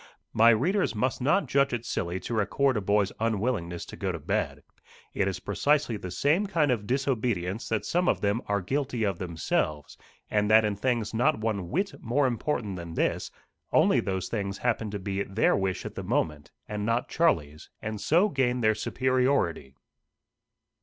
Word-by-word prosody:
My 115 Hz, +1 st, +6 dB
readers 155 Hz, -, +2 dB
must 125 Hz, +4 st, -1 dB
not 150 Hz, +10 st, +2 dB
judge 140 Hz, -1 st, +2 dB
it 120 Hz, -1 st, -3 dB
silly 85 Hz, -3 st, -2 dB
to -, -, -5 dB
record 130 Hz, +5 st, +1 dB
a 105 Hz, -, 0 dB
boy's 100 Hz, 0 st, +2 dB
unwillingness 105 Hz, -6 st, -1 dB
to -, -, -10 dB
go -, -, -2 dB
to -, -, -4 dB
bed. -, -, -2 dB, 0.5 s
It 100 Hz, -, +1 dB
is 95 Hz, -2 st, -2 dB
precisely 145 Hz, -5 st, +1 dB
the 95 Hz, -3 st, -6 dB
same 150 Hz, -, +1 dB
kind 160 Hz, -7 st, +2 dB
of 105 Hz, -4 st, -1 dB
disobedience 120 Hz, -7 st, -1 dB
that 110 Hz, -1 st, -1 dB
some 175 Hz, +1 st, +1 dB
of -, -, +1 dB
them 105 Hz, +3 st, +1 dB
are 100 Hz, 0 st, 0 dB
guilty 130 Hz, +1 st, -1 dB
of 100 Hz, -4 st, -1 dB
themselves, 80 Hz, -3 st, -2 dB, 0.3 s
and 105 Hz, 0 st, +1 dB
that 110 Hz, 0 st, +6 dB
in 105 Hz, -1 st, 0 dB
things 115 Hz, 0 st, -1 dB
not 135 Hz, +7 st, +2 dB
one 105 Hz, -5 st, -2 dB
whit 195 Hz, +6 st, -2 dB
more 130 Hz, +5 st, +1 dB
important 120 Hz, -5 st, -1 dB
than 85 Hz, -1 st, -7 dB
this, -, -, 0 dB, 0.4 s
only -, -, +4 dB
those 95 Hz, -1 st, -2 dB
things 100 Hz, -3 st, -3 dB
happen 115 Hz, -3 st, -1 dB
to 100 Hz, -, -4 dB
be 100 Hz, 0 st, -3 dB
their 100 Hz, +3 st, +2 dB
wish 95 Hz, -1 st, -2 dB
at -, -, -5 dB
the -, -, -5 dB
moment, 75 Hz, -2 st, -1 dB, 0.2 s
and 105 Hz, -1 st, -4 dB
not 115 Hz, +3 st, 0 dB
Charlie's, 75 Hz, -, 0 dB
and 110 Hz, -1 st, -5 dB
so 175 Hz, +7 st, +4 dB
gain 125 Hz, -7 st, 0 dB
their 110 Hz, -1 st, +4 dB
superiority. 125 Hz, -, 0 dB
110 Hz, 180 wpm, -27 LUFS, 100-130 Hz, 0.5 s, My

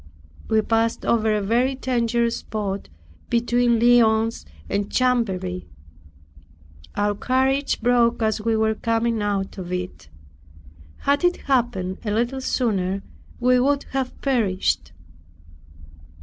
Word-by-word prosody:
We 220 Hz, -1 st, +3 dB
passed 225 Hz, +1 st, 0 dB
over 220 Hz, -2 st, +2 dB
a 210 Hz, -1 st, 0 dB
very 245 Hz, +6 st, +1 dB
dangerous 235 Hz, -2 st, 0 dB
spot 200 Hz, -2 st, -4 dB, 0.4 s
between 240 Hz, 0 st, +2 dB
Lyons 225 Hz, -1 st, +3 dB, 0.2 s
and 200 Hz, 0 st, -2 dB
Chamberry. 195 Hz, -8 st, 0 dB, 1.3 s
Our 205 Hz, 0 st, +1 dB
carriage 265 Hz, +6 st, 0 dB
broke 240 Hz, -1 st, +3 dB
as 220 Hz, -1 st, 0 dB
we 225 Hz, +1 st, +1 dB
were 220 Hz, 0 st, +2 dB
coming 230 Hz, 0 st, 0 dB
out 200 Hz, -1 st, -2 dB
of 180 Hz, -1 st, -6 dB
it. 180 Hz, -, -5 dB, 0.9 s
Had 285 Hz, +4 st, +1 dB
it 355 Hz, 0 st, +3 dB
happened 235 Hz, -9 st, 0 dB
a 215 Hz, -, -3 dB
little 240 Hz, +5 st, -1 dB
sooner, 195 Hz, -7 st, -1 dB, 0.4 s
we 250 Hz, 0 st, +4 dB
would 280 Hz, +2 st, +2 dB
have 265 Hz, -1 st, -3 dB
perished. 215 Hz, -, 0 dB
230 Hz, 115 wpm, -23 LUFS, 205-245 Hz, 1.3 s, we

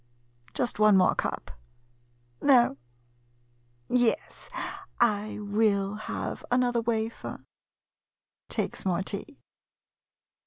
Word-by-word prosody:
Just 245 Hz, -3 st, 0 dB
one 210 Hz, -2 st, +6 dB
more 185 Hz, -, +5 dB
cup -, -, -3 dB, 0.5 s
— 120 Hz, 0 st, -39 dB
no 240 Hz, -, +6 dB, 0.6 s
— 120 Hz, 0 st, -38 dB
yes, 245 Hz, -2 st, 0 dB, 0.5 s
I 215 Hz, -3 st, +2 dB
will 205 Hz, -1 st, +1 dB
have 215 Hz, +1 st, -5 dB
another 245 Hz, -1 st, +2 dB
wafer. 225 Hz, -1 st, -3 dB, 1.1 s
[Takes -, -, -2 dB
more 185 Hz, -1 st, 0 dB
tea. 205 Hz, +9 st, -5 dB
205 Hz, 90 wpm, -28 LUFS, -, 1.1 s, one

